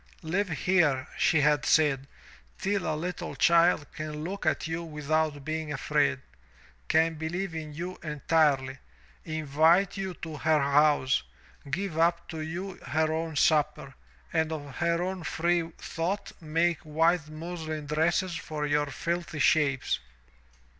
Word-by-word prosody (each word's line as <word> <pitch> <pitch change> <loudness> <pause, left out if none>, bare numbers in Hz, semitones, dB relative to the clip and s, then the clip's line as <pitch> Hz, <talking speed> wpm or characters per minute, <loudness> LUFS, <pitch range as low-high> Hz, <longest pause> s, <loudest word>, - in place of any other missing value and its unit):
"Live 185 +5 0
here, 160 -5 +2
she 160 -3 +3
had 150 0 +3
said, 140 -4 +3 0.5
"till 200 -3 -1
a - - -1
little 175 +3 -4
child 170 -2 +4
can 155 -1 -5
look 190 0 -4
at 155 - +1
you 165 +1 -3
without 150 -2 -1
being 160 -1 -3
afraid; 145 -1 +1 0.7
can 160 +1 +3
believe 165 +4 -3
in 155 -2 -5
you 175 +5 -6
entirely, 145 -4 +1 0.5
invite 160 +5 +2
you 190 -2 -3
to 160 -2 -7
her 155 +1 +3
house, 140 - +3 0.5
give 165 +2 -2
up 170 +1 +2
to 160 - -5
you 170 +5 -5
her 155 +1 0
own 160 0 -3
supper, 150 -2 +2 0.4
and 160 -1 +1
of 145 -4 -6
her 170 0 +1
own 185 0 -3
free 170 0 0
thought 185 +5 -3
make 165 +2 +1
white 160 +1 +1
muslin 155 -1 -5
dresses 165 +4 +1
for 155 -2 -4
your 145 0 +1
filthy 170 +2 -3
shapes. 145 -3 +2
160 Hz, 135 wpm, -28 LUFS, 150-170 Hz, 0.7 s, child